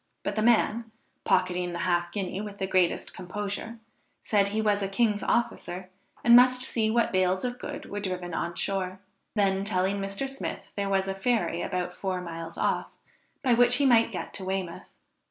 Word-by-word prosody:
But - - -2
the 215 - +1
man, 230 0 +3 0.4
pocketing 180 -1 +1
the - - -3
half 175 -1 +1
guinea 190 0 -3
with 205 -1 -7
the 190 - -1
greatest 185 -2 +1
composure, 205 +5 -5 0.5
said 200 -2 +3
he 210 +2 -1
was 210 -2 +2
a 195 - 0
king's 210 +1 +1
officer, 185 -5 -1 0.3
and 235 0 +8
must 250 +1 +6
see 225 -4 0
what 235 +1 +2
bales 185 +2 +1
of 245 0 -3
goods - - -6
were 205 - -5
driven 180 -3 -4
on 170 +1 -2
shore; 190 -1 -2 0.4
then 195 -2 +2
telling 195 0 0
Mr. 195 +7 -3
Smith 270 0 -6
there 200 -1 -1
was 195 -1 +1
a 195 - -1
ferry 195 -4 0
about 180 0 -2
four 190 -2 -2
miles 165 -1 -7
off, - - 0 0.6
by 255 -3 +4
which 245 +1 +6
he 280 - +3
might 230 -3 +5
get 185 - -5
to 190 - -3
Weymouth. 185 -2 -4
195 Hz, 185 wpm, -27 LUFS, 185-225 Hz, 0.6 s, and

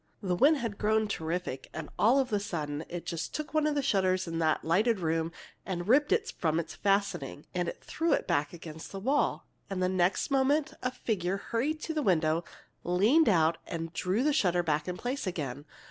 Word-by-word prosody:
"The 180 -2 +1
wind 290 - +5
had 230 -6 -4
grown 215 +1 +2
terrific, 165 -7 -3
and, 155 -1 -5
all 235 +6 +5
of 260 -4 +1
a 205 - +3
sudden, 155 -6 -3
it 175 -1 -5
just 170 -1 -4
took 305 0 -4
one 310 -1 +3
of 300 - 0
the 285 - +1
shutters 185 -6 +2
of 165 -1 -3
that 160 -1 +1
lighted 205 +7 +2
room, 165 -1 0 0.3
and 175 -2 -4
ripped 285 +6 +4
it 445 +1 +1
from 160 -1 +1
its 170 - -5
fastening, 195 -8 -1
and 175 -1 -1
threw 330 +1 -1
it - - +1
back 145 0 0
against 160 -2 -9
the 195 - -5
wall. 270 +8 +1 0.2
And 195 -2 -3
the 185 - +2
next 185 +8 +1
moment 275 +2 +2
a 255 - 0
figure 200 -7 -2
hurried 275 +10 -2
to 320 - -3
the 310 - 0
window, 165 - +2 0.4
leaned 215 - +4
out, 165 -3 +3
and 165 -1 -5
drew 190 +7 0
the 300 0 +3
shutter 180 -7 +2
back 150 -2 0
in 180 0 -3
place 250 0 -3
again. 145 -5 -4
185 Hz, 205 wpm, -30 LUFS, 165-250 Hz, 0.4 s, wind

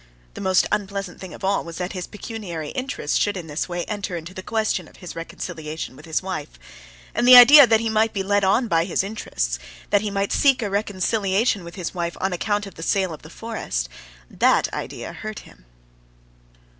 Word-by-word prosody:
The - - -8
most 190 -1 +3
unpleasant 200 -2 -3
thing 185 -2 -8
of - - -11
all 195 +1 +1
was 170 -1 -8
that 180 +1 -3
his 180 -2 -5
pecuniary 200 - -6
interests 255 - -2
should 205 -1 0
in 175 - -6
this 155 +3 -3
way 175 0 -3
enter 205 -4 -4
into 170 +2 -8
the 185 - -7
question 220 +2 -1
of - - -19
his 180 - -9
reconciliation 160 -3 -6
with - - -13
his 160 +2 -1
wife. 155 - -5 0.6
And 240 - +1
the 255 - +11
idea 270 +3 +11
that 225 -1 +4
he 230 - -1
might 220 0 +2
be 195 - -2
led 200 +1 +1
on 215 +6 +3
by 165 -4 +2
his 185 - 0
interests, 65 - -3 0.3
that 205 - +4
he 210 - -2
might 200 0 -1
seek 270 -4 +3
a 205 - -3
reconciliation 200 0 0
with 170 0 -10
his 180 -4 -4
wife 170 -2 -3
on 190 0 -1
account 205 +3 -1
of 195 - -10
the 165 - -11
sale 190 0 0
of 155 - -10
the 155 - -13
forest—that - - -2
idea - - -5
hurt - - -7
him. - - -18
190 Hz, 205 wpm, -23 LUFS, 170-210 Hz, 0.6 s, the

